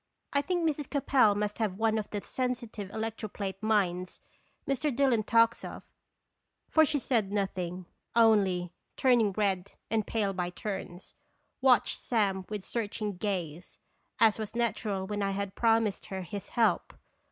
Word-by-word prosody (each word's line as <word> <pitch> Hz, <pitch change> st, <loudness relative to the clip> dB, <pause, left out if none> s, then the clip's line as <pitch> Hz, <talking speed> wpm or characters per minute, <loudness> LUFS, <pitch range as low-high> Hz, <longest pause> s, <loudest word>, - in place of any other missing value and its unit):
1 280 Hz, -, +3 dB
think 350 Hz, -1 st, +1 dB
Mrs. 295 Hz, -3 st, -2 dB
Capel 265 Hz, -7 st, +3 dB
must 210 Hz, +1 st, -2 dB
have 205 Hz, -4 st, -1 dB
one 220 Hz, 0 st, +2 dB
of 210 Hz, -, -5 dB
the 205 Hz, -, -3 dB
sensitive 240 Hz, -6 st, -3 dB
electroplate 210 Hz, -3 st, -4 dB
minds 185 Hz, -5 st, 0 dB, 0.5 s
Mr. 275 Hz, +2 st, 0 dB
Dillon 260 Hz, -4 st, +3 dB
talks 230 Hz, +1 st, +3 dB
of; -, -, -7 dB, 0.8 s
for 315 Hz, -, +5 dB
she 295 Hz, -, 0 dB
said 230 Hz, -7 st, 0 dB
nothing, 185 Hz, -3 st, -2 dB, 0.3 s
only, 195 Hz, -6 st, +4 dB, 0.2 s
turning 240 Hz, -5 st, +4 dB
red 195 Hz, -2 st, 0 dB, 0.2 s
and 220 Hz, -2 st, +1 dB
pale 205 Hz, -3 st, 0 dB
by 180 Hz, -1 st, -2 dB
turns, 185 Hz, -1 st, -6 dB, 0.5 s
watched 255 Hz, -4 st, +4 dB
Sam 195 Hz, -5 st, 0 dB
with 210 Hz, -3 st, -5 dB
searching 210 Hz, -3 st, -3 dB
gaze, 180 Hz, -4 st, -4 dB, 0.4 s
as 220 Hz, -1 st, +5 dB
was 215 Hz, +1 st, -5 dB
natural 215 Hz, -4 st, -1 dB
when 205 Hz, +1 st, -3 dB
I 195 Hz, 0 st, 0 dB
had 200 Hz, 0 st, -3 dB
promised 225 Hz, -2 st, +1 dB
her 190 Hz, -1 st, -4 dB
his 200 Hz, +3 st, -7 dB
help. 230 Hz, -2 st, +1 dB
210 Hz, 145 wpm, -30 LUFS, 195-230 Hz, 0.8 s, for